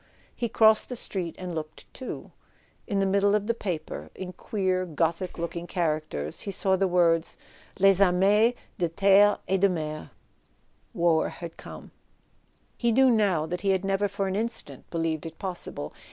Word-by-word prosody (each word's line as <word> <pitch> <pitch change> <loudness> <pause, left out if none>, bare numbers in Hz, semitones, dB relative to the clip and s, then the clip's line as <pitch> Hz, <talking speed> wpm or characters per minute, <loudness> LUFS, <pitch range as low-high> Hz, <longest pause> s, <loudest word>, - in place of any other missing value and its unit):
He 235 - -2
crossed 220 0 +4
the 250 - -4
street 185 -7 -3
and 180 -1 -5
looked 155 -1 -6
too. 260 - -7 0.6
In 200 - -1
the 195 - +2
middle 200 +1 +3
of 210 -1 0
the 230 - +1
paper, 180 -8 -5
in 185 -1 -7
queer 185 -4 -1
Gothic 170 +2 -2
looking 170 0 -4
characters, 155 - -2
he - - -5
saw 190 -1 +1
the 190 +1 +1
words 170 -2 +2 0.2
" - - -25
Leg 195 0 +5
armees 200 +5 +4 0.2
tie 175 -2 +1
Cette - - -11 0.4
et 190 0 +1
Dc 200 - +5
90et... 155 -3 -4 0.9
War 170 -2 +2
had 170 -1 -8
come - - -11 0.8
He 235 -1 +1
knew 260 +2 +5
now 200 -9 +2
that 180 +2 -4
he 200 - 0
had 190 0 +1
never 195 +1 +1
for 200 0 -2
an 190 - -2
instant 215 - -5
be¬ 170 - -3
lieved 160 0 -2
it 160 - -11
possible. 180 - -6
185 Hz, 175 wpm, -27 LUFS, 165-200 Hz, 0.9 s, Leg